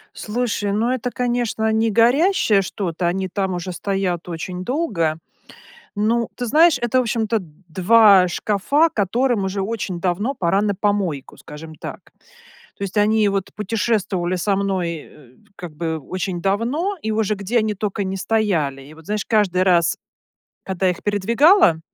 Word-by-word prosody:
Слушай, 210 -3 -2
ну, 225 +4 +1
это 255 -1 -2
конечно 240 -3 -1
не 220 +1 +1
горящее 235 - +3
что-то, 180 -2 -3
они 185 +2 -2
там 190 -1 -2
уже 175 +1 -4
стоят 180 -2 -2
очень 180 +2 -5
долго. 190 - -1 0.8
Ну, 225 +2 +1
ты 245 - -3
знаешь, 310 +2 +4
это 240 +1 +1
в - - +1
общем-то 225 -1 0 0.3
2 190 +1 +5
шкафа, 215 - +1
которым 225 +2 +1
уже 190 +1 -2
очень 195 -4 -4
давно 195 +10 -1
пора 190 0 +1
на 205 -1 0
помойку, 195 -9 -2
скажем 155 +2 -11
так. - - -10 0.6
То - - -10
есть 195 0 -5
они 210 0 +3
вот 195 -1 -2
путешествовали 205 -4 -1
со 195 +2 0
мной, 195 -3 -1 0.2
э, 130 -4 -19 0.2
как 175 -3 -9
бы, 160 -1 -2
очень 180 +3 -4
давно, 245 - -1
и 220 - -2
уже 215 -1 0
где 205 +4 -1
они 215 -1 0
токо 205 0 -3
не 190 0 -3
стояли. 185 -10 0
И 145 +3 -14
вот, 160 0 -16
знаешь, 210 -1 -2
каждый 195 -5 +2
раз, 175 -3 +3 0.7
когда 190 0 0
их 180 - -4
передвигала, 220 - +4
200 Hz, 155 wpm, -20 LUFS, 180-225 Hz, 0.8 s, 2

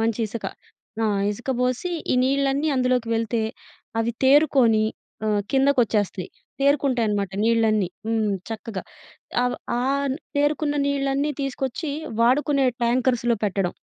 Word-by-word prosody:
మంచిసక. 225 0 -1 0.6
ఆ! - - +3 0.2
ఇసక 240 +5 -4
బోసి, 250 +8 0 0.2
ఈ - - +3
నీళ్ళన్నీ 275 +2 +1
అందులోకి 250 -2 +1
వెళ్తే, 225 0 0 0.6
అవి 235 +1 0
తేరుకోని 260 -6 +5 0.4
ఆహ్, 210 -1 +1
కిందకొచ్చేస్తాయి. 240 -9 +2 0.3
తేరుకుంటాయనమాట 245 -9 +2
నీళ్ళన్నీ. 220 -4 +2 0.2
హ్మ్. 220 -2 +1 0.2
చక్కగా. 220 -3 -5 0.6
అవ 250 - +1 0.3
ఆన్ 275 +1 0 0.2
తేరుకున్న 290 +1 +1
నీళ్ళన్నీ 280 +1 0
తీసుకొచ్చి 275 +2 -3 0.3
వాడుకునే 275 +3 +3 0.2
ట్యాంకర్స్‌లో 240 0 +2
పెట్టడం. 195 -3 0
250 Hz, 105 wpm, -23 LUFS, 225-275 Hz, 0.6 s, తేరుకోని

